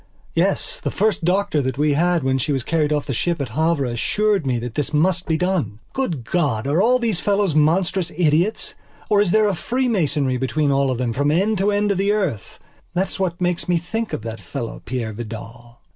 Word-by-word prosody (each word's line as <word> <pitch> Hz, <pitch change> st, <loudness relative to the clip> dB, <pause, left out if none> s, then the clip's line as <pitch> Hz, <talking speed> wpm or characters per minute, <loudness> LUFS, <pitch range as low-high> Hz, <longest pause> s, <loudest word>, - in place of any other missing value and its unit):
Yes, -, -, 0 dB
the -, -, -2 dB
first 215 Hz, -4 st, 0 dB
doctor 185 Hz, -2 st, +1 dB
that 130 Hz, 0 st, -2 dB
we 150 Hz, 0 st, +2 dB
had 170 Hz, +1 st, +2 dB
when 130 Hz, 0 st, +1 dB
she 140 Hz, -, -1 dB
was 135 Hz, -3 st, 0 dB
carried 155 Hz, 0 st, 0 dB
off 150 Hz, -2 st, 0 dB
the 135 Hz, -, -3 dB
ship 170 Hz, +7 st, -1 dB
at 140 Hz, -4 st, -3 dB
Havre 155 Hz, +3 st, +1 dB
assured 195 Hz, -, 0 dB
me 125 Hz, -2 st, +1 dB
that 120 Hz, 0 st, -5 dB
this 145 Hz, +2 st, -2 dB
must 180 Hz, +3 st, +1 dB
be 160 Hz, -2 st, +1 dB
done. 180 Hz, -, -1 dB, 0.2 s
Good 175 Hz, -, -2 dB
God, 135 Hz, -6 st, 0 dB
are 150 Hz, +6 st, +2 dB
all 250 Hz, +4 st, +4 dB
these 225 Hz, -7 st, 0 dB
fellows 200 Hz, -4 st, +1 dB
monstrous 170 Hz, +4 st, +2 dB
idiots, 175 Hz, +5 st, +1 dB, 0.4 s
or 205 Hz, -1 st, +5 dB
is 205 Hz, -, +2 dB
there 215 Hz, +3 st, +4 dB
a 200 Hz, -, +1 dB
freemasonry 175 Hz, -, 0 dB
between 140 Hz, +3 st, 0 dB
all 135 Hz, 0 st, +2 dB
of 130 Hz, -, -1 dB
them 120 Hz, -2 st, -1 dB
from 145 Hz, +3 st, +1 dB
end 195 Hz, +6 st, +1 dB
to 200 Hz, +2 st, +2 dB
end 205 Hz, 0 st, +1 dB
of 195 Hz, -, 0 dB
the 200 Hz, +1 st, +2 dB
earth?... 185 Hz, -, -2 dB, 0.4 s
That 190 Hz, +1 st, +1 dB
is -, -, -6 dB
what 180 Hz, -3 st, -1 dB
makes 180 Hz, -1 st, -1 dB
me 175 Hz, -, +3 dB
think 220 Hz, +7 st, -3 dB
of -, -, -4 dB
that 115 Hz, 0 st, -6 dB
fellow 120 Hz, -5 st, -6 dB
Peire 120 Hz, -3 st, -3 dB
Vidal. 120 Hz, +2 st, -9 dB
160 Hz, 220 wpm, -21 LUFS, 135-195 Hz, 0.4 s, or